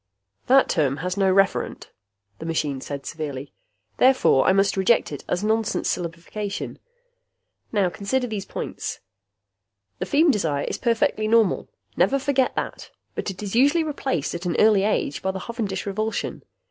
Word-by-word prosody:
"That 265 +1 +6
term 145 -5 +1
has 180 0 -1
no 195 -2 +3
referent," 195 +1 +1 0.5
the - - -7
machine 145 -5 -1
said 140 0 -6
severely. 145 -3 -5 0.4
"Therefore 255 - +4
I - - +6
must 195 +1 +3
reject 190 +1 +2
it 145 - -6
as 180 +3 0
nonsense 220 0 +1
syllabification. 180 +4 -5 0.9
Now 195 -5 +2
consider 250 +8 -1
these 210 -5 -4
points: - - -5 1.0
The - - -3
feem 310 +2 +4
desire 155 - 0
is - - -3
perfectly 225 -2 +1
normal. 220 -3 +3 0.3
Never 275 - +3
forget 270 -1 +1
that. - - -4 0.2
But - - -3
it 195 +1 -7
is 200 - -4
usually 285 +7 +4
replaced 270 - -2
at 175 +1 -4
an 170 - -1
early 215 -2 +5
age 205 -8 0
by 190 - -1
the 190 0 -3
hovendish 215 -5 -4
revulsion. 215 +2 -2
200 Hz, 155 wpm, -24 LUFS, 170-230 Hz, 1.0 s, That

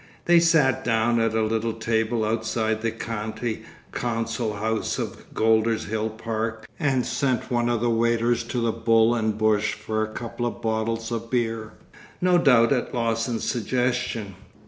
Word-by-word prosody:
They 175 0 +6
sat 160 -6 +3
down 115 0 +2
at 115 -1 +1
a 110 - +2
little 110 +1 0
table 110 0 0
outside 110 0 -1
the 115 - 0
County 110 0 -4 0.3
Council 115 -1 -2
house 110 +2 -1
of - - -6
Golders 110 0 +2
Hill 110 +1 -2
Park 110 0 -4
and 135 -5 +1
sent 130 -2 -1
one 120 -1 +1
of 120 -2 0
the 120 - +2
waiters 115 +1 +2
to 120 +1 -3
the 115 -1 +1
Bull 115 0 +3
and 110 -2 0
Bush 105 -1 +2
for 110 0 -3
a 110 - 0
couple 120 +1 -4
of 120 - -5
bottles 110 +1 -2
of 115 0 -4
beer, 115 -3 -1 0.5
no 180 -1 +4
doubt 125 -5 +5
at 125 0 -2
Lawson's 115 0 -1
suggestion. 120 -3 -1
115 Hz, 160 wpm, -24 LUFS, 110-120 Hz, 0.5 s, They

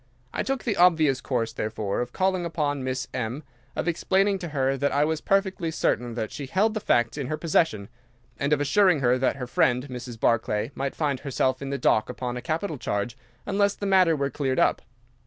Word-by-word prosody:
I - - -1
took 270 -1 -2
the 220 -5 -1
obvious 160 -7 +4
course, 115 -3 -1
therefore, 105 -2 -2
of 120 0 -4
calling 185 +2 0
upon 145 -5 -1
Miss 130 0 -2
Morrison, 125 +4 -3 0.3
of - - -2
explaining 195 +3 +1
to 175 - -5
her 135 -3 0
that 140 +1 0
I 145 +1 +3
was 160 0 -1
perfectly 190 -3 +1
certain 120 -6 -1
that 110 -2 -3
she 140 -2 -6
held 210 +9 +2
the 215 - -2
facts 120 - +1
in 135 - -3
her 155 +2 -2
possession, 155 -12 +1 0.5
and 140 +1 0
of 150 - +3
assuring 180 +2 +3
her 125 0 +3
that 130 - +1
her 130 -2 -5
friend, 125 +1 +1
Mrs. 125 -2 -7
Barclay, 110 +1 +1
might 135 0 -3
find 145 -4 -1
herself 130 -2 -1
in 140 - -4
the 140 - -2
dock 110 - +2
upon 125 -1 -4
a 125 - -4
capital 160 -1 -3
charge 105 +4 -2 0.3
unless 200 0 +1
the 200 - -5
matter 185 -4 +4
were 140 -1 -1
cleared 130 -1 -1
up. - - +3
140 Hz, 210 wpm, -26 LUFS, 125-170 Hz, 0.5 s, obvious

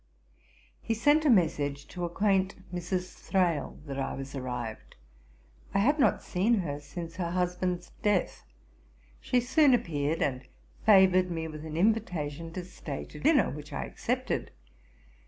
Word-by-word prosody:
He 225 - -1
sent 290 +7 +3
a - - +5
message 145 - +2
to 175 -1 -4
acquaint 190 +2 +1 0.2
Mrs. 180 +1 -3
Thrale 175 -5 0
that 140 -2 -5
I 135 - -2
was 135 0 -7
arrived. 125 -4 -5 0.8
I - - +5
had 285 +10 +3
not - - +3
seen 205 +7 +2
her 145 -4 -4
since 165 +3 -8
her 175 -2 -1
husband's 180 0 -1
death. 205 -4 +1 0.8
She 250 - +1
soon 260 +2 +4
appeared, 155 -6 -1
and 130 -2 -1 0.5
favoured 185 -3 +6
me 165 -2 -3
with 155 -1 -8
an 155 0 -5
invitation 170 -6 0
to 180 -1 -5
stay 155 -6 -6
to 150 - -10
dinner, 285 - +4
which 150 0 -8
I 65 - -2
accepted. - - -2
175 Hz, 145 wpm, -29 LUFS, 150-195 Hz, 0.8 s, favoured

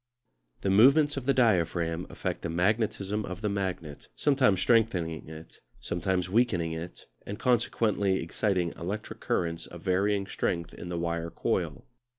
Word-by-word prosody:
The 95 - +1
movements 140 +8 +6
of 135 -2 -5
the 140 - +4
diaphragm 85 -7 +1
affect - - -4
the 85 - -3
magnetism 105 +3 0
of 90 0 -6
the 105 - 0
magnet, 90 -7 -4
sometimes 130 -9 +3
strengthening 90 -9 +1
it, 80 0 -11 0.2
sometimes 90 +6 -1
weakening 95 -6 +1
it, 80 +2 -7 0.2
and 100 - -6
consequently 110 -5 +1
exciting 90 0 0
electric 100 +6 -5
currents 85 -1 -1
of 85 -1 -11
varying 100 +2 +1
strength 85 -3 -2
in 85 - -8
the 85 - -3
wire 85 0 -2
coil. - - -2
95 Hz, 145 wpm, -28 LUFS, 85-110 Hz, 0.2 s, movements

